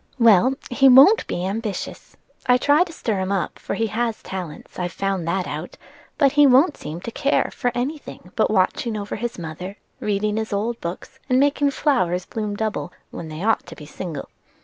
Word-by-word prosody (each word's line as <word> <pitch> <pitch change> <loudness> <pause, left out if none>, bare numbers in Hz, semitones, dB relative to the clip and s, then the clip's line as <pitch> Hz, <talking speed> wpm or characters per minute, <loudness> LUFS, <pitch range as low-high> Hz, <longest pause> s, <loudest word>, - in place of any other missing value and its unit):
"Well, 230 +1 +5 0.2
he 270 +2 +5
won't 275 - +7
be 175 - -2
ambitious. 210 +1 -5 0.3
I 250 0 +6
try 290 +6 +4
to 345 - -10
stir 220 -10 -2
him 190 +1 -2
up, 190 -5 -2
for - - -4
he 225 - 0
has 225 +1 -2
talents; 180 -4 -7
I've 175 -1 -2
found 195 -4 -2
that 185 +1 0
out: 155 +4 -6 0.4
but 280 -3 +4
he 290 0 +6
won't 275 +5 +5
seem 160 +3 -7
to 230 - -6
care 275 +5 +1
for 245 -3 -1
any 275 +6 -2
thing - - -12
but - - +2
watching 230 -3 +1
over 205 0 -4
his 240 +2 -4
mother, 175 +3 -6 0.2
reading 210 +1 -1
his 220 -1 -3
old 225 +4 -2
books, 180 +10 -7
and 255 0 +4
making 285 0 +3
flowers 185 - +1
bloom 210 -2 -4
double 215 -4 -3 0.2
when 165 - -7
they 155 +3 -6
ought 225 -3 +1
to 165 - -9
be 150 - -11
single." 155 -1 -6
215 Hz, 195 wpm, -22 LUFS, 180-255 Hz, 0.4 s, won't